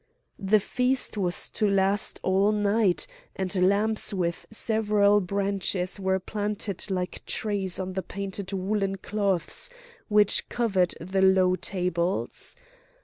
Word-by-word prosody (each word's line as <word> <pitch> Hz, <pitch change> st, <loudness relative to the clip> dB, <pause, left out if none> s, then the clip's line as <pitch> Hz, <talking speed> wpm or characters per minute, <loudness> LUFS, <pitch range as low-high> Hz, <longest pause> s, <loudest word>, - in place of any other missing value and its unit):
The 205 Hz, +2 st, +3 dB
feast 250 Hz, +5 st, 0 dB
was 180 Hz, -4 st, 0 dB
to 210 Hz, -2 st, +1 dB
last 195 Hz, +1 st, +2 dB
all 195 Hz, +2 st, +3 dB
night, 205 Hz, -2 st, +2 dB, 0.3 s
and 185 Hz, -1 st, +2 dB
lamps 215 Hz, +2 st, +2 dB
with 175 Hz, -4 st, -2 dB
several 210 Hz, -2 st, +3 dB
branches 195 Hz, 0 st, -1 dB
were 190 Hz, 0 st, +1 dB
planted 205 Hz, 0 st, -3 dB
like 180 Hz, -2 st, -3 dB
trees 200 Hz, -4 st, -1 dB
on 185 Hz, 0 st, -4 dB
the 190 Hz, -, -2 dB
painted 195 Hz, 0 st, -5 dB
woollen 195 Hz, +1 st, -1 dB
cloths 200 Hz, -, -1 dB, 0.4 s
which 210 Hz, -1 st, +3 dB
covered 195 Hz, -7 st, +1 dB
the 190 Hz, +3 st, -1 dB
low 190 Hz, -1 st, +4 dB
tables. 180 Hz, 0 st, -2 dB
195 Hz, 120 wpm, -26 LUFS, 185-210 Hz, 0.4 s, low